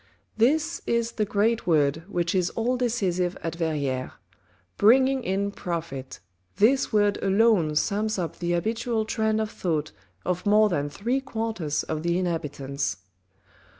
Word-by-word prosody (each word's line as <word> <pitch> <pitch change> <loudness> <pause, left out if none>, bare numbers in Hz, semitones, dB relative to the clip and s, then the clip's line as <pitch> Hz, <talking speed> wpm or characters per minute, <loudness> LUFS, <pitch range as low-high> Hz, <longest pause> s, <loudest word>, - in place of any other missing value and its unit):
This 300 +8 +2
is 235 0 +1
the 215 - -1
great 215 +2 +1
word 150 -2 +2
which 175 -4 -1
is 185 -2 +1
all 240 +3 -1
decisive 190 -8 0
at 165 - -2
Verrieres. 145 -6 -2 0.7
"BRINGING 260 +4 +5
IN 200 0 -1
PROFIT," 165 -9 -5 0.4
this 260 +6 +3
word 205 -2 +2
alone 195 -6 +3
sums 210 +7 0
up 170 -3 -4
the 175 0 -1
habitual 225 +4 -1
trend 220 -1 0
of 220 -1 -2
thought 155 -4 -2 0.3
of 180 -1 -1
more 210 +1 +5
than 145 -5 -1
three 235 - -1
quarters 220 - -2
of 155 -1 -3
the 170 +1 0
inhabitants. 145 - -2
195 Hz, 140 wpm, -26 LUFS, 165-225 Hz, 0.7 s, BRINGING